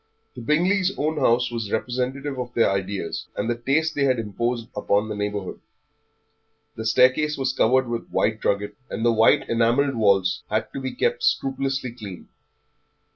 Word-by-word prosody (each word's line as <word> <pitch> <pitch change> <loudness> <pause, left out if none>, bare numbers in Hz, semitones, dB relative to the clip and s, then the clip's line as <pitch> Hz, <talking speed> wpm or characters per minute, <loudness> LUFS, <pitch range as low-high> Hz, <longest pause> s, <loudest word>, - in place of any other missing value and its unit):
The 125 - -8
Bingleys' 180 - +1
own 155 +1 -1
house 120 -2 +2
was 115 -3 -4
representative 130 +4 -2
of 125 -1 -6
their 115 -4 +3
ideas, 95 -2 -3
and 105 - -2
the 120 - 0
taste 145 +7 0
they 140 - 0
had 130 -2 +2
imposed 115 +2 -2
upon 105 +1 +1
the 105 - -3
neighbourhood. 105 -2 -4 1.2
The 110 0 -4
staircase 130 +7 +3
was 135 -1 -1
covered 130 +1 +3
with 120 -1 -4
white 110 0 0
drugget, 100 0 0 0.2
and 115 - -3
the 120 - +4
white 110 0 +4
enamelled 120 +5 +2
walls 100 -5 +2
had 110 +1 -2
to 135 - -5
be 130 - -4
kept 475 +1 0
scrupulously 135 - 0
clean. 105 -6 -10
120 Hz, 165 wpm, -23 LUFS, 110-135 Hz, 1.2 s, the